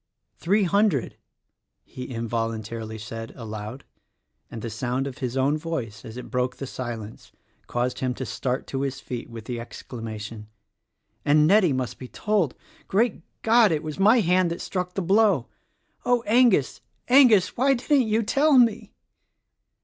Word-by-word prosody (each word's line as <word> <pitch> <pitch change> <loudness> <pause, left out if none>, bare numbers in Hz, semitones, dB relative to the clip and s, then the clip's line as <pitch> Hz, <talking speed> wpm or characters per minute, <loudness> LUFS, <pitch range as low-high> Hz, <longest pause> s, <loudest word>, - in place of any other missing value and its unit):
"Three 200 +5 +2
hundred!" 200 - +1 0.7
he 125 - -8
involuntarily 115 -1 -3
said, 115 +1 -7
aloud; 110 +2 -7 0.7
and 115 - -8
the 115 - -3
sound 125 +4 -2
of 140 0 -7
his 130 -1 -3
own 140 +4 +2
voice 130 -10 -5
as 110 +2 -9
it 125 - -8
broke 125 0 0
the 135 - -6
silence 120 -5 -7 0.4
caused 125 +1 -2
him 130 -1 -1
to 130 - -5
start 125 +4 -3
to 135 - -4
his 135 -1 -3
feet 125 -3 -6
with 115 -2 -9
the 120 -1 -4
exclamation, 110 -2 -8 0.8
"And 150 +1 +4
Nettie 190 -1 +5
must 130 -2 -3
be 130 - -8
told! 200 - 0 0.3
Great 210 -1 +1 0.2
God: 225 -2 +5
It 155 -1 -1
was 155 +2 -6
my 220 +5 +5
hand 180 -1 +3
that 170 - -4
struck 180 -1 -3
the 195 - -1
blow! 195 - +3 0.5
Oh, 245 -1 +2
Angus, 225 - +3 0.3
Angus, 230 -10 +6
why 270 +2 +3
didn't 260 0 +2
you 220 +1 +1
tell 285 +5 +3
me." 235 -3 +3
140 Hz, 155 wpm, -25 LUFS, -, 0.8 s, Angus